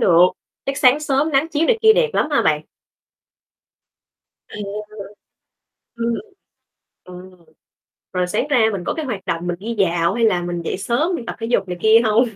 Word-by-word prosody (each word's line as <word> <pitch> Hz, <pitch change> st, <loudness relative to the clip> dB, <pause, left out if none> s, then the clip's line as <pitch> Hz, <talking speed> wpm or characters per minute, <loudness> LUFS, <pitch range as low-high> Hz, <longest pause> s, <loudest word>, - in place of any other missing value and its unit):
được. 170 Hz, -2 st, +4 dB, 0.5 s
Chắc 275 Hz, 0 st, -2 dB
sáng 265 Hz, +1 st, +4 dB
sớm 295 Hz, +1 st, 0 dB
nắng 275 Hz, +4 st, +2 dB
chiếu 325 Hz, 0 st, 0 dB
này 460 Hz, -2 st, +2 dB
kia 440 Hz, 0 st, +7 dB
đẹp 465 Hz, +1 st, +2 dB
lắm -, -, +1 dB
hả -, -, +2 dB
bạn? -, -, +1 dB, 1.8 s
À. -, -, -12 dB, 1.4 s
Ừm. 235 Hz, 0 st, -1 dB, 0.9 s
Ừm, 180 Hz, 0 st, -11 dB, 0.8 s
rồi 180 Hz, -1 st, 0 dB
sáng 215 Hz, +9 st, -1 dB
ra 275 Hz, -, +3 dB
mình 195 Hz, -4 st, -4 dB
có -, -, -2 dB
cái 315 Hz, -, -4 dB
hoạt 215 Hz, -8 st, -5 dB
động 170 Hz, 0 st, -3 dB
mình 175 Hz, -, -1 dB
đi 230 Hz, +4 st, -5 dB
dạo 170 Hz, -2 st, +2 dB
hay 235 Hz, +1 st, -1 dB
là 180 Hz, -5 st, +2 dB
mình 175 Hz, 0 st, -4 dB
dậy 165 Hz, -, -3 dB
sớm 245 Hz, -, 0 dB
mình 240 Hz, -, -7 dB
tập -, -, -5 dB
thể 225 Hz, -, -4 dB
dục 230 Hz, -5 st, 0 dB
này 180 Hz, -, -5 dB
kia 220 Hz, +1 st, +6 dB
hông? 220 Hz, +2 st, +3 dB
230 Hz, 185 wpm, -20 LUFS, 180-275 Hz, 1.8 s, kia